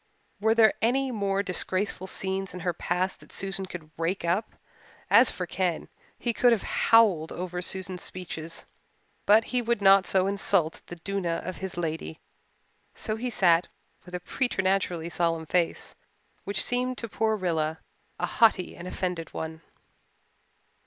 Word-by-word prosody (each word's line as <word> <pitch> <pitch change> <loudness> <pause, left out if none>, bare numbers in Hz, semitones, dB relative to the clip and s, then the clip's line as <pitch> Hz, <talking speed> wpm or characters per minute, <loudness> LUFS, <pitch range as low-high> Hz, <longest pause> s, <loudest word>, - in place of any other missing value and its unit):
Were 220 +2 +3
there 220 -2 +6
any 260 +3 +2
more 200 -3 0
disgraceful 190 0 -1
scenes 190 0 -2
in 180 - -6
her 175 0 0
past 180 +2 -1
that - - -17
Susan 195 -1 -1
could 160 -4 -9
rake 170 +2 -1
up? 185 +6 0 0.6
As 240 +2 +8
for 180 0 -4
Ken, 175 -1 -2 0.3
he 235 - -1
could 245 +2 +4
have 225 -4 +2 0.3
howled 200 -9 +5
over 180 0 -4
Susan's 185 0 -3
speeches, 165 -3 -6 0.6
but 215 +2 +7
he 250 +2 -1
would 235 -1 0
not 195 -2 +6
so 190 -1 +3
insult 195 -4 +1
the 175 - -7
duenna 175 -1 -2
of 185 - -5
his 190 -2 -6
lady, 160 - -3 0.8
so 215 - -2
he 245 +3 -3
sat 175 -6 +3 0.4
with 180 0 -8
a - - -2
preternaturally 185 -6 0
solemn 165 -2 0
face 170 +1 0 0.5
which 200 -1 +1
seemed 250 +1 0
to 230 - -4
poor 220 0 0
Rilla 160 -4 -1 0.4
a - - 0
haughty 215 -6 +3
and 175 - -8
offended 180 -3 -4
one. 160 0 -5
185 Hz, 150 wpm, -27 LUFS, 175-205 Hz, 0.8 s, As